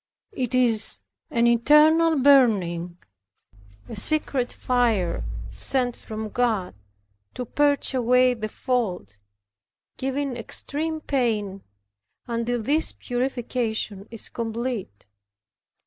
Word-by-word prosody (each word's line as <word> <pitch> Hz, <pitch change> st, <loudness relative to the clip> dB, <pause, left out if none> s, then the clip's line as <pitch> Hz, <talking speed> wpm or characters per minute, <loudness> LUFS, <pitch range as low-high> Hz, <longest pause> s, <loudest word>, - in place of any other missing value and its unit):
It 255 Hz, -, -3 dB
is 225 Hz, -, +6 dB, 0.3 s
an 235 Hz, 0 st, +1 dB
internal 300 Hz, +7 st, +4 dB
burning, 200 Hz, -11 st, +3 dB, 0.9 s
a -, -, -8 dB
secret 260 Hz, +1 st, +2 dB
fire 230 Hz, -, 0 dB, 0.3 s
sent 250 Hz, -3 st, 0 dB
from 220 Hz, 0 st, -7 dB
God 220 Hz, -6 st, -1 dB, 0.6 s
to 250 Hz, -, -4 dB
purge 285 Hz, +2 st, +1 dB
away 250 Hz, 0 st, +3 dB
the 215 Hz, -3 st, -5 dB
fault, 195 Hz, -, -3 dB, 0.8 s
giving 270 Hz, 0 st, -3 dB
extreme 310 Hz, +6 st, -3 dB
pain, 215 Hz, -9 st, -2 dB, 0.6 s
until 235 Hz, 0 st, -2 dB
this 300 Hz, +7 st, +2 dB
purification 240 Hz, -5 st, -3 dB
is 230 Hz, -1 st, -7 dB
complete. 230 Hz, -, -5 dB
245 Hz, 90 wpm, -24 LUFS, 220-265 Hz, 0.9 s, is